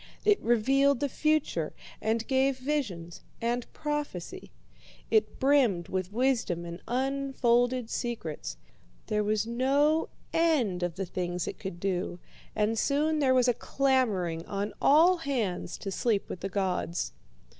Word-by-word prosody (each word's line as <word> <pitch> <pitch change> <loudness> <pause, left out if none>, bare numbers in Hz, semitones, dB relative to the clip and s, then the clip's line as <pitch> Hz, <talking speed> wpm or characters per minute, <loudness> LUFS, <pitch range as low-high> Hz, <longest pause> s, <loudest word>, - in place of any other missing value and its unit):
It 420 -1 +4
revealed 270 +4 +3
the 285 - +1
future, 300 - 0 0.3
and 225 +1 0
gave 265 0 +2
visions 240 - -3 0.2
and 240 +1 -2
prophecy. 295 - -4 0.6
It 215 -1 +2
brimmed 255 -11 +3
with 185 0 -2
wisdom 230 -8 0
and 170 +1 -7
unfolded 255 -2 +1
secrets. 225 -11 -4 0.5
There 210 0 0
was 215 +1 +1
no 280 +7 +2 0.2
end 280 - +2
of 175 -2 -2
the 195 0 -3
things 180 0 -3
it - - -5
could 180 -3 -6
do, 180 -1 -2 0.4
and 215 +1 +1
soon 300 +4 +1
there 260 -3 +3
was 255 -1 +4
a 245 - +4
clamouring 220 -12 0
on 200 +1 -3
all 335 +6 +6
hands 240 - -2
to 195 - -5
sleep 210 0 0
with - - -5
the 195 - -4
gods. 185 -3 -1
235 Hz, 135 wpm, -29 LUFS, 190-275 Hz, 0.6 s, all